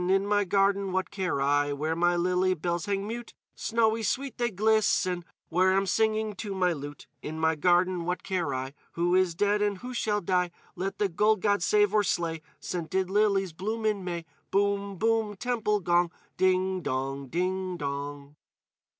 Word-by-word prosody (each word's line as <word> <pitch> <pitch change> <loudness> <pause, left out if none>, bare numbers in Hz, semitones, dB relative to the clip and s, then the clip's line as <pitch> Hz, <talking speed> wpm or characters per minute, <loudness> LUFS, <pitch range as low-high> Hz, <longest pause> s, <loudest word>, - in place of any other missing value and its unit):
_ 180 +1 0
In 195 +1 +3
my 205 0 +2
garden; 195 0 +2
what 190 0 -1
care 185 -7 -1
I 145 +1 +2
Where 155 +3 -1
my 175 +1 +2
lily 180 +1 +2
bells 175 +3 -2
hang 200 0 -1
mute! 235 +1 -6 0.2
Snowy 225 0 +1
sweet 255 +4 -2
they 240 0 +1
glisten 205 -4 +2 0.3
Where 185 +3 +3
I'm 195 - +2
singing 215 +2 +1
to 200 -2 -4
my 180 -2 +2
lute. 145 -1 -8 0.2
In 155 +1 -5
my 160 0 +3
garden; 175 +2 +2
what 180 +1 -2
care 185 -7 -1
I 130 +1 -3 0.2
Who 175 +1 +1
is 185 -2 +3
dead 205 +3 +2
and 205 -1 +1
who 250 +6 -7
shall 210 -3 0
die? 180 -1 +1 0.3
Let 190 +2 -3
the 205 - +2
gold 210 +3 +2
gods 205 -5 +2
save 205 -1 +3
or 215 - +5
slay 170 -4 -1 0.2
Scented 180 +2 -2
lilies 200 -3 +2
bloom 220 +6 -3
in 210 -3 +1
May. 170 -2 -4 0.2
Boom, 200 0 0
boom, 225 0 +1
temple 220 -3 0
gong! 175 0 +3 0.3
Ding 185 0 +2
dong! 135 -1 -3
_Ding 185 +2 -1
dong! 140 0 -5
185 Hz, 175 wpm, -28 LUFS, 170-205 Hz, 0.3 s, or